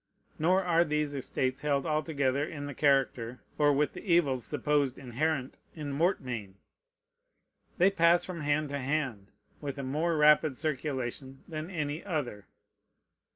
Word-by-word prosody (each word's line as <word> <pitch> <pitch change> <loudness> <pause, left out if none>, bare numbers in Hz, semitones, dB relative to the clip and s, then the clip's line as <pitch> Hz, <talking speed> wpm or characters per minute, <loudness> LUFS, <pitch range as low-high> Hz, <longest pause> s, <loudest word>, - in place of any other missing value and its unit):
Nor 185 +5 +3
are 170 -1 +4
these 150 -2 -1
estates 130 -1 -2
held 140 -2 0
altogether 145 -3 0
in 150 -2 -5
the 145 - -5
character 130 -4 +1 0.2
or 145 -1 +5
with 145 0 +1
the - - -8
evils 155 - +2
supposed 145 -3 0
inherent 135 +1 -2 0.2
in 150 -3 -5
mortmain. 125 - -1 1.2
They 190 +1 +5
pass 170 -2 +4
from 175 -3 -6
hand 145 0 0
to 140 0 -3
hand 130 -7 -2 0.3
with 145 -1 -4
a 140 - -4
more 155 +5 0
rapid 150 -2 +5
circulation 135 -3 -3
than 155 +1 -5
any 155 -3 -3
other. 145 - -3
145 Hz, 140 wpm, -30 LUFS, 135-155 Hz, 1.2 s, or